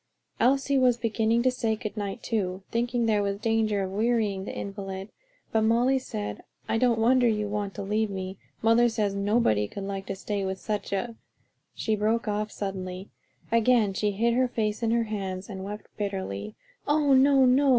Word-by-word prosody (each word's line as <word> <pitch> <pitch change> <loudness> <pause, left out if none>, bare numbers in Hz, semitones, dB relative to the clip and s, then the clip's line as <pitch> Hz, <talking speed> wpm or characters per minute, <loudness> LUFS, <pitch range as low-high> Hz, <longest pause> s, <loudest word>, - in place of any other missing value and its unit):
Elsie 275 +2 +3
was 250 -2 +4
beginning 230 0 +1
to 255 - +4
say 225 -3 0
good 215 -1 -6
night 200 -2 -4
too, 190 -4 -2
thinking 240 0 0
there 215 -2 +2
was 200 0 -1
danger 215 -2 +1
of 190 - -4
wearying 210 -2 0
the - - -4
invalid, 195 0 -6 0.4
but 220 - +2
Molly 240 +4 +3
said, 105 - -5 0.3
"I 225 - +1
don't 240 -2 +3
wonder 245 +2 +4
you 210 -2 +1
want 205 -1 -3
to - - -4
leave 210 +2 0
me; 190 -1 -5 0.2
mother 230 +2 +5
says 210 -3 0
nobody 200 - +2
could 200 - -7
like 195 0 -5
to 195 - -3
stay 200 +1 -3
with 190 0 -2
such 210 +2 -3
a 225 +4 -2 0.3
" - - -48
she 220 - 0
broke 220 +2 0
off 210 0 -1
suddenly, 190 -1 -5 0.4
again 230 -3 +3
hid 210 +4 +1
her 255 +1 +3
face 215 -3 -2
in 230 - +1
her 230 0 +2
hands 195 -3 -4
and 190 -1 -6
wept 210 +2 -6
bitterly. 150 - -4 0.3
"Oh, 290 -1 +3
no, 270 0 +6
no! 270 +3 +4
215 Hz, 185 wpm, -27 LUFS, 195-235 Hz, 0.4 s, no